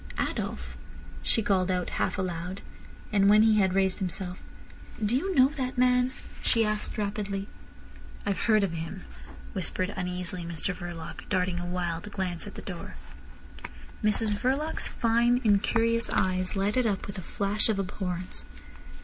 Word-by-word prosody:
"Adolf," - - -3 0.5
she 225 - +1
called 190 -2 +2
out 180 -1 0
half - - +1
aloud; 180 0 -3 0.5
and 200 -1 +5
when 210 +1 +7
he 220 -1 +5
had 190 -2 +3
raised 190 -1 +2
himself: 185 -1 -4 0.7
"Do 220 +4 +2
you 375 +8 0
know 260 -1 +7
that 260 -3 -3
man?" 250 0 +4 0.3
she 230 -2 +3
asked 215 +1 -2
rapidly. 200 -1 -2 0.8
"I've 200 -1 0
heard 215 -3 +4
of 195 - +1
him," 165 +3 -5 0.5
whispered 185 0 -1
uneasily 180 -1 -3
Mr 170 +3 -1
Verloc, 175 -3 -7
darting 180 -2 +1
a 175 - -4
wild 175 +1 -2
glance 180 -4 -3
at - - -9
the - - -8
door. - - -7 1.1
Mrs 215 0 +2
Verloc's 270 +9 0
fine, 235 +1 +3
incurious 230 +2 +3
eyes 185 0 +1
lighted 210 +5 +2
up 200 -3 -1
with 200 -1 -6
a - - -5
flash 200 +5 +1
of 215 - +2
abhorrence. 180 -2 -4
195 Hz, 150 wpm, -28 LUFS, 180-220 Hz, 1.1 s, when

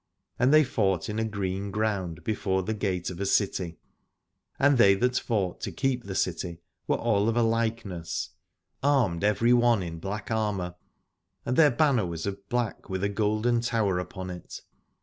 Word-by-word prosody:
And 125 +3 +4
they 155 0 +7
fought 100 - 0
in 105 +1 -2
a - - +1
green 100 -2 -3
ground 95 -6 -2
before 95 -2 0
the 110 - -2
gate 95 -4 -2
of 90 - -8
a 100 - -1
city: 95 -5 0 0.8
and 140 -2 +4
they 100 -3 +7
that 125 +5 +1
fought 100 -7 -2
to - - -3
keep 130 -3 -1
the 95 -1 -5
city 85 -1 -2 0.3
were - - +2
all 110 -2 +1
of 115 - 0
a 120 - +4
likeness, 110 -8 -2 0.5
armed 125 -12 +2
every 115 +3 +3
one 120 -4 +4
in 85 -1 -6
black 100 +4 -5
armour, 105 -5 -1 0.7
and 125 - 0
their 155 0 +7
banner 125 - +2
was 85 -1 -5
of 100 0 -6
black 120 -3 -2
with 95 0 -2
a 100 - +2
golden 110 +3 +1
tower 110 -6 +1
upon 95 0 -6
it. 90 -1 -9
105 Hz, 175 wpm, -27 LUFS, 95-115 Hz, 0.8 s, they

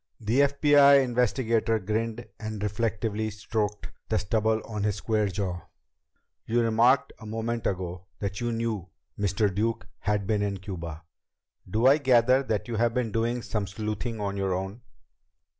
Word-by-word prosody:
The 115 +4 +1
FBI 140 0 +6
investigator 120 -2 +1
grinned 110 +3 -2
and 110 -1 -5
reflectively 110 0 -1
stroked 105 0 -3 0.2
the - - +2
stubble 110 +4 +1
on 105 -2 -4
his 105 -1 +1
square 105 0 0
jaw. 95 -2 -3 0.9
"You 120 +2 +2
remarked 115 +4 +3
a 110 - -10
moment 115 +1 -2
ago 90 -1 -4
that 100 +2 -4
you 120 0 0
knew 115 -5 -2 0.3
Mr. 100 0 +1
Duke 110 +4 -1
had 105 -1 0
been 105 0 +1
in 100 -1 -1
Cuba. 85 -5 -7 0.7
Do 110 +6 +1
I 140 +3 +7
gather 130 -1 +4
that 110 -6 -2
you 115 -2 -3
have 115 +1 +1
been 125 -3 0
doing 115 +2 -1
some 105 -3 -2
sleuthing 110 +3 -4
on 100 -1 -2
your 95 -2 0
own?" 95 +5 -5
110 Hz, 155 wpm, -27 LUFS, 100-115 Hz, 0.9 s, I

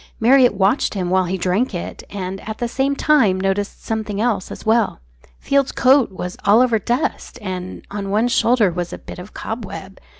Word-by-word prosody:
Marriott 250 0 +5
watched 195 +5 +1
him 180 -2 -2
while 185 0 +3
he 185 +2 -2
drank 190 +6 0
it, 175 - -6
and 195 -1 -5
at 220 - -4
the 240 - -2
same 275 +3 0
time 265 -12 +3
noticed 195 +2 -2
something 215 -2 -3
else 215 -5 0
as - - -9
well 225 0 +2 0.4
Field's 280 -1 +1
coat 260 -3 +4
was 180 -1 -6
all 205 +3 +5
over 240 -3 +3
dust, 240 +5 -2
and 185 -3 -6
on 200 -1 -4
one 215 +4 +2
shoulder 235 -4 +3
was 175 0 -4
a - - -6
bit - - -10
of 180 +4 -11
cobweb. 200 -4 -7
205 Hz, 190 wpm, -20 LUFS, 190-240 Hz, 0.4 s, Marriott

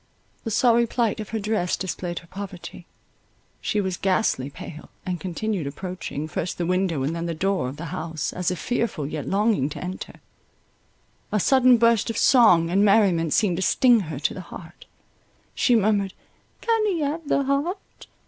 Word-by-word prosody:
The - - -1
sorry 235 +1 +3
plight 230 -2 0
of 215 - -6
her 225 - -2
dress 210 -4 -1
displayed 175 -2 -4
her 170 - -8
poverty, 185 -2 -9 0.7
she 210 - 0
was 190 -3 -2
ghastly 185 -8 0
pale, 155 +2 -10 0.2
and 180 -2 -3
continued 190 -2 -3
approaching, 155 -1 -5
first 165 +2 -4
the 175 - -1
window 180 -5 0
and 155 +5 -1
then 170 0 -3
the 165 - -3
door 185 -5 0
of 135 - -9
the 165 - -6
house, 160 -3 -4
as 180 -1 -1
if 180 - -2
fearful, 220 - -2
yet 150 0 -5
longing 200 -8 +1
to 150 - -7
enter. 185 +1 -7 1.1
A 210 - +1
sudden 255 +2 +5
burst 230 0 +3
of 230 - -3
song 180 -11 +5
and 195 +3 +3
merriment 195 -6 +3
seemed 185 -2 +2
to - - -2
sting 245 +4 +4
her 155 - -4
to 145 - -1
the 185 - -7
heart; 170 -1 -12 0.7
she 245 - +3
murmured, 205 -3 +1 0.5
"Can 455 -2 +1
he 355 -6 0
have 300 +2 -2
the 280 - +2
heart?" 285 +8 -3
190 Hz, 175 wpm, -24 LUFS, 170-225 Hz, 1.1 s, sudden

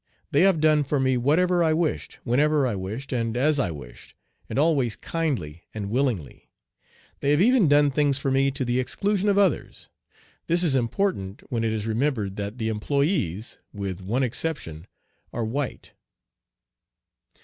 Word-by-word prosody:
They 145 - +4
have 190 -3 +4
done 155 -1 +4
for 145 +1 -1
me 130 -1 +2
whatever 170 +8 +2
I 160 -1 +3
wished, 160 -1 -2
whenever 145 +4 +2
I 120 - 0
wished, 105 +9 -5
and 115 -1 -1
as 145 +3 +2
I 100 - +1
wished, 65 -7 -11 0.3
and - - -4
always 140 -7 +2
kindly 125 - -3
and 100 -2 -4
willingly. 120 - -2 0.7
They 140 - 0
have 145 +1 +4
even 240 -5 +4
done 145 0 +4
things 145 -1 +2
for 135 -1 -1
me 135 +1 +3
to 135 -1 -3
the 120 +1 +1
exclusion 200 +10 0
of 200 - +2
others. 195 -5 0 0.6
This 175 +2 +1
is 160 -6 +2
important 120 - -1
when 115 -2 0
it 110 - +1
is 110 -1 -2
remembered 115 -4 -1
that 100 +3 -4
the 110 -2 -2
employés, 110 - -1 0.2
with 100 -2 -5
one 115 +8 -1
exception, 115 - -3 0.4
are 115 - -2
white. 130 +4 -4
135 Hz, 160 wpm, -25 LUFS, 110-155 Hz, 0.7 s, They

